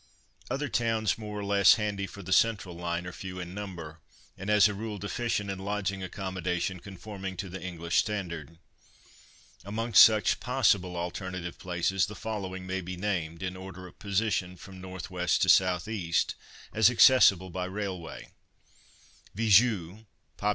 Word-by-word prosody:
Other 140 +4 -2
towns 115 -4 0
more 105 -1 -6
or 100 - -4
less 100 -1 +6
handy 105 -2 -2
for 100 - -10
the 95 +2 -1
central 100 -3 +2
line 85 0 -3
are 90 - -5
few 90 +1 -7
in 90 0 -6
number, 85 -6 -7 0.4
and 95 +2 -6
as 105 -1 +6
a 105 - -3
rule 105 +1 -5
deficient 105 0 -2
in 95 - -5
lodging 100 -1 -2
accommodation 95 -1 -3
conforming 95 0 -8
to 100 - -5
the 95 +1 -7
English 85 -2 -3
standard. 85 -7 -2 1.1
Amongst 110 +4 +4
such 110 -1 +4
possible 100 -8 +1
alternative 90 0 -5
places 90 +1 0
the 105 - -8
following 95 -4 -5
may 95 +1 -3
be 90 +1 -6
named 90 -3 -2
(in 95 0 -3
order 95 0 -9
of 90 - -14
position 100 -3 -1
from 95 +1 -12
N.W. 95 0 -8 0.3
to 95 - +5
S.E.) 90 0 -3 0.6
as 110 0 +6
accessible 100 -7 +6
by 90 +1 -3
railway:— 95 -5 -6 1.1
VIZEU 110 -2 +3 0.3
(pop. 105 - -1
95 Hz, 150 wpm, -29 LUFS, 90-105 Hz, 1.1 s, less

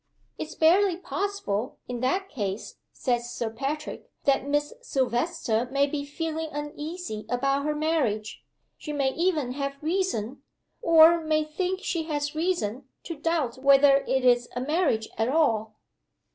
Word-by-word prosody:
'It's 315 - -5
barely 355 +3 +4
possible, 375 - -3
in 245 -1 -4
that 370 +11 0
case,' 205 - -4
says 240 -2 -1
Sir 230 -2 -3
Patrick, 285 +6 -4
'that 275 0 +2
Miss 290 +4 0
Silvester 255 - 0
may 280 +1 +3
be 285 0 -3
feeling 320 +2 -4
uneasy 295 -4 -5
about 275 +3 +1
her 300 0 0
marriage. 290 -10 -1 0.4
She 300 - -5
may 275 -2 +1
even 320 -7 0
have 275 +1 -3
reason 305 - -1 0.4
or 330 0 +7
may 310 0 +2
think 365 +5 -2
she 330 -3 -1
has 295 -1 -2
reason 295 - -1 0.2
to 335 - -5
doubt 295 -5 -1
whether 275 +1 +6
it 265 -1 +1
is 245 -1 +4
a - - -1
marriage 285 -6 +1
at 225 +2 +2
all. 225 -8 +1
290 Hz, 145 wpm, -26 LUFS, 250-325 Hz, 0.4 s, or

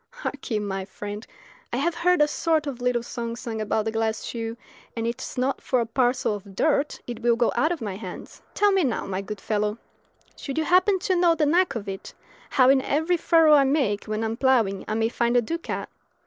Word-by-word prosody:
Hark 475 - -6
ye, 220 - +1
my 195 -2 -3
friend, 205 +3 -7 0.4
I - - -1
have 345 - +1
heard 340 -1 +3
a - - +2
sort 315 0 0
of 265 -4 -5
little 245 -1 +1
song 235 -1 -5
sung 230 -2 -5
about 215 0 0
the 220 - -1
glass 220 0 -1
shoe, 230 -1 -5 0.4
and 230 - -1
it 235 +1 -3
is - - -7
not 260 +2 0
for 255 - +1
a 235 - +1
parcel 245 0 +1
of 200 -1 -9
dirt 300 +2 +1
it 240 -2 -6
will 235 0 +3
go 235 0 +2
out 310 - +2
of 340 - -3
my 195 -3 -4
hands. 190 -4 -9
Tell 415 0 +4
me 385 -2 +3
now, 250 -5 -1
my 190 0 -3
good 210 +1 -7
fellow, 210 0 -1 0.6
should 275 0 -6
you 320 - +2
happen 370 +4 +4
to 375 0 0
know 345 -1 +4
the 310 - +2
knack 350 +3 +2
of 215 -3 -5
it, 195 0 -7 0.3
how 255 -2 +4
in 270 -1 +4
every 320 +7 +1
furrow 325 -2 +5
I 285 -2 +7
make 265 -7 +1
when 215 +1 -2
I - - 0
am 225 +1 -3
ploughing 230 -8 +2
I 215 - -1
may 225 0 +2
find 235 +1 +1
a - - +5
ducat? 335 +9 -4
240 Hz, 230 wpm, -25 LUFS, 220-305 Hz, 0.6 s, I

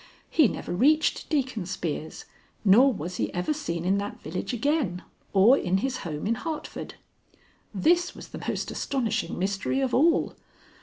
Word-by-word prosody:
He 310 -6 +5
never - - -5
reached 300 - +2
Deacon 260 - -1
Spear's, 165 -4 -4 0.4
nor 240 +8 +7
was 180 - -5
he - - -1
ever 180 +12 0
seen 170 - -4
in 195 +2 +2
that 205 0 -5
village 160 +4 -4
again 245 - 0 0.3
or 205 +7 +6
in 185 -8 +1
his 255 +5 -1
home 150 -7 -5
in 220 - +2
Hartford. 305 +6 -5 0.8
This 340 - +2
was - - -10
the - - -8
most - - -2
astonishing 255 -6 -2
mystery 195 +7 -1
of 265 -2 0
all. 330 +6 +3
220 Hz, 155 wpm, -26 LUFS, 180-280 Hz, 0.8 s, nor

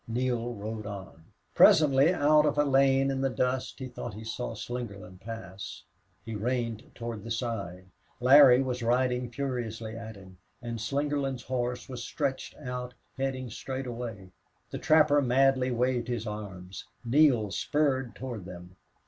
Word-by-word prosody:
Neale 120 0 -1
rode 110 0 -5
on. 95 -5 -9 0.3
Presently 145 +1 +6
out 150 -3 +4
of 145 - 0
a 145 - +5
lane 135 -1 +3
in 135 0 -2
the 135 - +2
dust 125 0 -1
he 130 - -5
thought 120 -3 -7
he 110 - -8
saw 115 +1 -4
Slingerland 100 -5 -7
pass. 100 -3 -8 0.4
He 115 - -5
reined 115 +1 -2
toward 115 -3 -5
the 115 - -7
side. 105 -6 -3 0.3
Larry 130 0 +8
was 125 -1 -3
riding 125 +1 +1
furiously 115 -4 -4
at 110 -1 -8
him, 95 -2 -14 0.2
and 120 -2 -5
Slingerland's 140 +1 -1
horse 125 -1 -2
was 125 -3 -6
stretched 135 +1 -3
out, 125 0 -6 0.2
heading 130 -2 -2
straight 130 +3 -5
away. 115 -6 -6 0.4
The - - -4
trapper 150 -2 +5
madly 130 0 +3
waved 125 -1 0
his 120 -3 -3
arms. 100 -4 -7 0.2
Neale 120 -5 +4
spurred 135 -3 0
toward 120 -7 -6
them. 90 0 -11
125 Hz, 150 wpm, -29 LUFS, 110-135 Hz, 0.4 s, Larry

